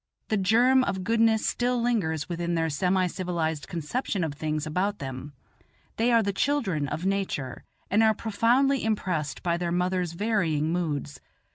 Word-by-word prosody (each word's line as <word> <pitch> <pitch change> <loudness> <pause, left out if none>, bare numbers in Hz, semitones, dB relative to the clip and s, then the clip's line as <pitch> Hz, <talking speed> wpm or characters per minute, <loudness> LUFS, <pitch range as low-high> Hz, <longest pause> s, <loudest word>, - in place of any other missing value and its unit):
The 215 - +2
germ 240 +7 +4
of 190 -1 -2
goodness 225 +1 +2
still 245 0 0
lingers 185 -11 0
within 170 -1 -2
their 165 -1 0
semi 185 +5 +1
civilized 170 -4 -2
conception 180 - -2
of 155 -3 -2
things 155 +1 -2
about 185 +6 -1
them; 135 +1 -7 0.6
they 235 +2 +2
are 230 -1 +4
the 200 -1 -1
children 195 - 0
of 160 +6 -4
Nature, 190 -10 -2 0.3
and 210 +3 +4
are 220 -1 +4
profoundly 245 +6 +2
impressed 180 -9 -2
by 170 -1 +1
their 170 -1 -2
mother's 180 -1 0
varying 170 -6 0
moods. 150 -5 -3
185 Hz, 155 wpm, -27 LUFS, 160-220 Hz, 0.6 s, germ